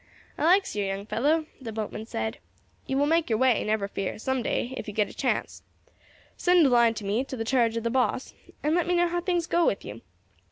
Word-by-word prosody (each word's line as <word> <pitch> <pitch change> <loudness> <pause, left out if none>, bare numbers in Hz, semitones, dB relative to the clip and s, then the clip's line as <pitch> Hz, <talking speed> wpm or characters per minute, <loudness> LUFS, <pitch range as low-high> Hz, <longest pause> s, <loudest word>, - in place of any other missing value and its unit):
"I - - -1
likes 375 - +3
yer, 205 - 0
young 195 +1 -3
fellow," 300 +9 +1 0.2
the 230 -3 -6
boatman 220 0 -5
said; 110 - -3 0.5
"you 270 - -1
will 285 - +3
make 325 -1 +2
your 220 - +2
way, 255 -1 +3
never 215 -2 0
fear, 195 -1 -4
some 260 +4 -1
day, 245 +2 -2
if - - -6
you 205 - -6
get 210 -1 +1
a - - -13
chance. - - -2 0.7
Send 355 -3 +4
a - - +5
line 235 -2 +4
to 210 - -6
me, 210 +6 0
to 260 - -6
the 225 - -3
charge 230 -2 +2
of 230 - -3
the 230 - -1
boss, 255 0 0 0.3
and 300 +1 +2
let 350 0 +1
me 355 - +2
know 350 0 +3
how 350 0 -1
things 350 -2 0
go 345 0 +2
with 200 - 0
you. 105 +3 -8
245 Hz, 240 wpm, -27 LUFS, 215-320 Hz, 0.7 s, a